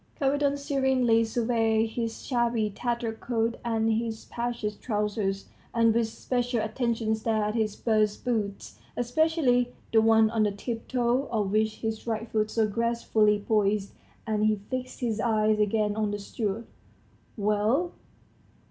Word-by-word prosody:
Kapiton 285 +1 +2
serenely 265 -5 +2
surveyed 225 -1 +1
his 230 -1 -4
shabby, 235 -4 +1
tattered 235 0 -3
coat 230 -1 -1
and 225 -1 +1
his 225 0 -3
patched 235 -3 -4
trousers, 210 -3 -1 0.3
and 230 -1 +4
with 230 0 +2
special 245 +1 -1
attention 225 0 -1
stared 220 -1 0
at - - -2
his 220 -3 0
burst 215 -2 +1
boots, 215 -5 -2 0.2
especially 245 -1 +2 0.2
the 220 - +6
one 220 -1 +5
on 225 -1 +1
the 210 -1 +3
tiptoe 240 +4 -1
of 210 -4 -1
which 215 +1 +1
his 220 0 -3
right 225 0 -2
foot 215 -1 +1
so 220 -1 +1
gracefully 215 -2 +1
poised, 205 -2 +1 0.3
and 215 -1 +1
he 215 - +3 0.2
fixed 255 +1 -4
his 225 -3 -1
eyes 215 -1 +2
again 210 0 +1
on 215 -1 0
the 205 - -2
steward. 210 +2 -3 0.7
"Well?" 215 - +1
225 Hz, 140 wpm, -27 LUFS, 215-240 Hz, 0.7 s, the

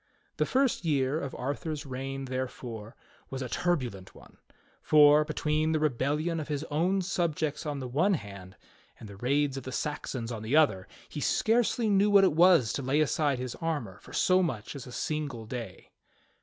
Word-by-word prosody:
The - - +1
first 265 -6 +1
year 145 -2 +1
of 140 -2 -5
Arthur's 145 +3 -4
reign, 135 +1 -5
therefore, 125 -3 -5 0.3
was 135 0 -4
a 125 - -5
turbulent 125 - -2
one; - - -17 0.4
for, 150 0 +6
between 155 +1 0
the 155 - +1
rebellion 150 +4 0
of 155 - -5
his 150 -1 -2
own 180 +6 +1
subjects 160 -5 -1
on 145 -1 -2
the 130 -2 -5
one 170 +11 +2
hand, 100 - -9 0.4
and 110 - -10
the 100 -1 -11
raids 135 +4 0
of 135 - -6
the 130 - -6
Saxons 130 -5 -4
on 110 -2 -5
the 110 +6 -1
other, 120 -12 +3 0.2
he 150 - -7
scarcely 230 - +2
knew 200 0 +3
what 200 -1 +6
it 190 - +4
was 165 - +5
to - - -2
lay 135 +3 +1
aside 150 -2 +1
his 125 -1 -4
armor 145 - -3
for - - -15
so 185 0 +3
much 130 - -3
as 135 - -8
a - - -9
single 140 -4 -3
day. 120 0 -8
145 Hz, 185 wpm, -29 LUFS, 125-160 Hz, 0.4 s, for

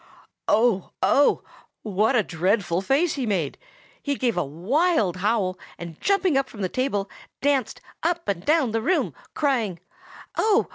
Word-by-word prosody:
Oh, 215 -4 +2
oh! 285 - +4 0.4
what 215 +4 +1
a 220 - +4
dreadful 180 0 0
face 280 - +2
he 265 -4 -2
made! 175 -9 -1 0.4
He 285 -1 -1
gave 245 -4 0
a 175 - +1
wild 200 - +1
howl, 195 -2 0 0.2
and 170 -2 -9
jumping 385 -5 +2
up 270 - -3
from 205 -3 -7
the 185 - 0
table, 230 -6 -1 0.3
danced 275 -3 0 0.2
up 340 0 -1
and 185 -3 -1
down 300 -4 +2
the 225 0 0
room, 360 +10 +1 0.2
crying, 235 - 0 0.6
"Oh! 435 0 +3
225 Hz, 150 wpm, -24 LUFS, 185-285 Hz, 0.6 s, oh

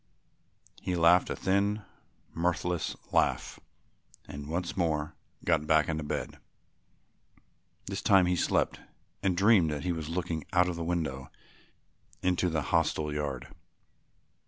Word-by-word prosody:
He 90 -1 -2
laughed 85 +1 +5
a - - -2
thin 100 +2 +1 0.5
mirthless 90 0 -1 0.2
laugh - - +1 0.7
and 70 0 -7
once 85 +2 -2
more 80 -4 0 0.3
got 75 - +2
back 80 -2 +4
into 80 -1 -2
bed. 75 - -4 1.5
This - - -4
time 95 -2 +5
he 90 0 +2
slept - - +1 0.4
and 95 -3 +1
dreamed 95 -4 +5
that 75 -1 -3
he 90 - 0
was 80 -2 -4
looking 85 -2 -2
out 90 -1 +4
of 90 - -2
the 85 - -4
window 80 -6 -2 0.9
into 90 0 +2
the 80 -3 -1
hostel 80 -2 0
yard. 70 -4 -3
85 Hz, 130 wpm, -29 LUFS, 75-90 Hz, 1.5 s, laughed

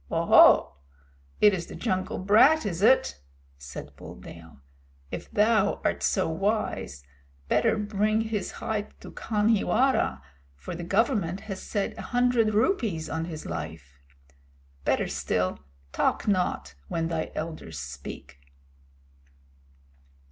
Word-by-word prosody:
"Oho! - - +5 0.6
It 210 -1 +7
is 175 -3 -3
the - - -9
jungle 185 -5 -2
brat, 230 +10 +5
is 180 -3 -3
it?" 220 - +3 0.4
said 70 -1 -9
Buldeo. 80 -4 -12 0.5
"If - - -6
thou 215 -1 +2
art - - 0
so 190 - +1
wise, 160 - -2 0.4
better 125 - +2
bring 210 +1 0
his 220 -3 -3
hide 210 -1 -4
to - - -10
Khanhiwara, 225 +4 +1 0.3
for 70 - -8
the 175 0 -6
Government 195 - 0
has 195 -3 -7
set 205 -2 -3
a - - -9
hundred 240 -3 +3
rupees 215 - 0
on 160 0 -2
his 160 -2 -7
life. 70 -4 -7 0.9
Better - - +1
still, 90 -4 -1 0.3
talk - - 0
not 180 - 0
when 165 -1 -2
thy 165 -1 -3
elders 155 - -6
speak." 70 0 -9
195 Hz, 120 wpm, -27 LUFS, 155-215 Hz, 0.9 s, It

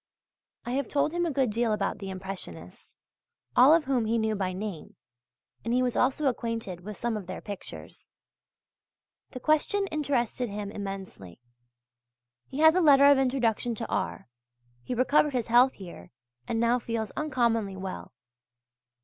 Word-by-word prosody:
I 240 - -4
have 275 +2 -1
told 290 +1 +1
him 345 0 0
a - - -1
good 265 -4 +1
deal 230 0 +1
about 210 - -2
the 195 - -6
Impressionists, 185 - -7 0.6
all 255 +4 +7
of 325 0 +5
whom 260 -5 0
he 225 +2 +1
knew 220 -1 0
by 190 -3 -2
name, 190 -3 -6 0.7
and 230 +2 0
he 255 - +3
was 250 -1 0
also 270 +4 +1
acquainted 230 -8 -2
with 210 +2 -8
some 235 -1 -2
of 200 -4 -6
their 185 - -6
pictures. 200 -2 -9 1.2
The 255 - -8
question 310 - +1
interested 260 -5 -1
him 205 0 -5
immensely. 195 - -7 1.1
He 275 - -4
has 315 0 +7
a 370 - +3
letter 280 -3 +6
of 280 - +5
introduction 245 -3 0
to 225 - -5
R. - - -3 0.5
He 250 - -4
recovered 280 +4 +3
his 240 -3 -2
health 245 +3 +5
here 170 - -11 0.4
and 225 - -1
now 235 +2 +2
feels 230 -2 -3
uncommonly 235 -9 0
well. 190 0 -6
235 Hz, 160 wpm, -28 LUFS, 200-270 Hz, 1.2 s, all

